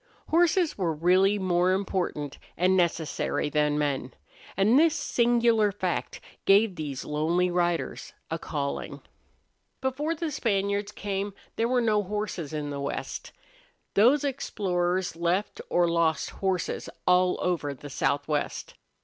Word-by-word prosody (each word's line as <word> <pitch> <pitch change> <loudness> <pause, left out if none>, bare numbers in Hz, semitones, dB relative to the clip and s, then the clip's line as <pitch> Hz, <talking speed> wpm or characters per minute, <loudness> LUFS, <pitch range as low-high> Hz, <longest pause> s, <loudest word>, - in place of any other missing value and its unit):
Horses 340 - +3
were 170 -4 0
really 185 +5 +3
more 185 -1 +2
important 180 -7 -2 0.2
and 185 +2 +3
necessary 165 -4 0
than 150 0 +2
men; 140 -3 -1 0.4
and 215 +7 +5
this 325 0 +4
singular 235 -5 +2
fact 190 -3 -3 0.3
gave 200 0 +5
these 145 -5 -5
lonely 170 +4 +1
riders 175 -1 -1 0.2
a 165 - -2
calling. 140 -3 -4 0.8
Before 285 +5 -1
the 325 -1 -3
Spaniards 200 -4 0
came 200 -1 -3 0.2
there 230 - +1
were 250 0 +2
no 215 -3 +2
horses 205 -6 -4
in 150 -2 -3
the 140 -1 -4
West. 140 - -4 0.6
Those 250 +8 +5
explorers 185 - -1
left 175 +4 -1
or 175 0 +3
lost 165 -3 +1
horses 190 -2 -2 0.2
all 180 0 +4
over 170 -5 -1
the 145 +2 -10
southwest. 145 +2 -1
185 Hz, 125 wpm, -27 LUFS, 160-210 Hz, 0.8 s, and